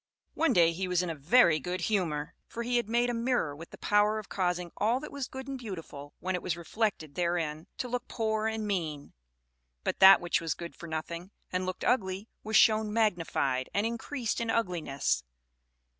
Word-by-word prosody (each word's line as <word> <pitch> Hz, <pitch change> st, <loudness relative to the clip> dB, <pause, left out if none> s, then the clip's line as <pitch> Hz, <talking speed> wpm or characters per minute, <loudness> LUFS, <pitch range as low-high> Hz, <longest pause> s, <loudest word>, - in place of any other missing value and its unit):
One 325 Hz, +1 st, +2 dB
day 170 Hz, -3 st, +5 dB
he 185 Hz, +3 st, -3 dB
was 180 Hz, 0 st, +1 dB
in 175 Hz, -, -2 dB
a -, -, -5 dB
very 160 Hz, -, +5 dB
good 180 Hz, +6 st, -3 dB
humor, 165 Hz, -8 st, -1 dB
for 235 Hz, -, -5 dB
he 245 Hz, +1 st, +1 dB
had 235 Hz, -3 st, -1 dB
made 240 Hz, +1 st, +2 dB
a -, -, -3 dB
mirror 230 Hz, -, 0 dB
with 165 Hz, +3 st, -10 dB
the -, -, -12 dB
power 210 Hz, +1 st, +3 dB
of 215 Hz, -, -7 dB
causing 180 Hz, -2 st, -1 dB
all 230 Hz, +4 st, +2 dB
that 300 Hz, -, -8 dB
was 280 Hz, -3 st, -4 dB
good 265 Hz, 0 st, -8 dB
and 270 Hz, -1 st, -4 dB
beautiful 165 Hz, -, -8 dB
when 185 Hz, +1 st, -2 dB
it 180 Hz, -, -1 dB
was 175 Hz, -2 st, -2 dB
reflected 170 Hz, -4 st, -2 dB
therein, 170 Hz, -2 st, -1 dB
to 250 Hz, -, -3 dB
look 245 Hz, +1 st, -3 dB
poor 220 Hz, -1 st, -1 dB
and 220 Hz, -1 st, -2 dB
mean; 160 Hz, -8 st, -3 dB, 0.7 s
but -, -, -2 dB
that 195 Hz, 0 st, +10 dB
which 175 Hz, -1 st, 0 dB
was 165 Hz, -2 st, -1 dB
good 170 Hz, 0 st, -8 dB
for 170 Hz, -, -9 dB
nothing 170 Hz, +3 st, -5 dB, 0.2 s
and 185 Hz, 0 st, -1 dB
looked 185 Hz, -, -4 dB
ugly 195 Hz, -3 st, +1 dB, 0.2 s
was 220 Hz, +1 st, -2 dB
shown 215 Hz, -1 st, +5 dB
magnified 165 Hz, -, +1 dB
and 205 Hz, -, +2 dB
increased 235 Hz, +1 st, -2 dB
in 230 Hz, -, -2 dB
ugliness. 165 Hz, -, 0 dB
190 Hz, 200 wpm, -30 LUFS, 170-225 Hz, 0.7 s, that